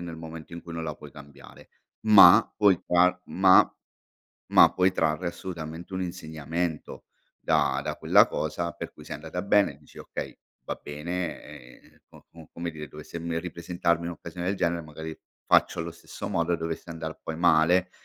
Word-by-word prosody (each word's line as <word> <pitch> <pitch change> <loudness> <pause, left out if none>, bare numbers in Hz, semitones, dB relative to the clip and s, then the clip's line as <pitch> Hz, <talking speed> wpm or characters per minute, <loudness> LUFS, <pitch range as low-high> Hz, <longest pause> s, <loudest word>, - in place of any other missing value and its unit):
nel 85 -2 -7
momento 80 0 -9
in 85 - -8
cui 85 - -9
non 80 0 -4
la 75 -2 -4
puoi 75 -1 -13
cambiare, 70 -1 -15 0.4
ma 105 0 +8
puoi 100 -4 +4
trar 90 +1 +3
ma 95 0 +5 0.8
ma - - +7
puoi 90 0 +3
trarre 80 +3 0
assolutamente 85 0 -7
un 95 - -2
insegnamento, 80 -2 -4 0.4
da - - +1
da - - -4
quella - - +5
cosa, 85 0 -3
per - - -8
cui - - -14
se - - -8
è - - -3
andata 80 +4 -5
bene, 100 -7 +2
dici: 75 - -21
"Okay, - - -7 0.3
va - - -3
bene 85 +4 -4 0.4
ehm, - - -24
co - - -18
com 80 -2 -14
come 85 0 -4
dire 75 -2 -9
dovesse 75 +3 -9
me 85 0 -2
ripresentarmi 85 0 -2
un 85 - -3
occasione 85 +1 -8
del 95 - +1
genere 85 -1 0
magari 80 +1 -8 0.3
faccio - - +3
allo 85 0 -4
stesso 85 - -8
modo." 85 -3 0
E 85 - 0
dovesse 80 +1 -5
andar 80 -1 -6
poi 80 - -5
male, 90 +2 +4
85 Hz, 180 wpm, -26 LUFS, 80-90 Hz, 0.8 s, ma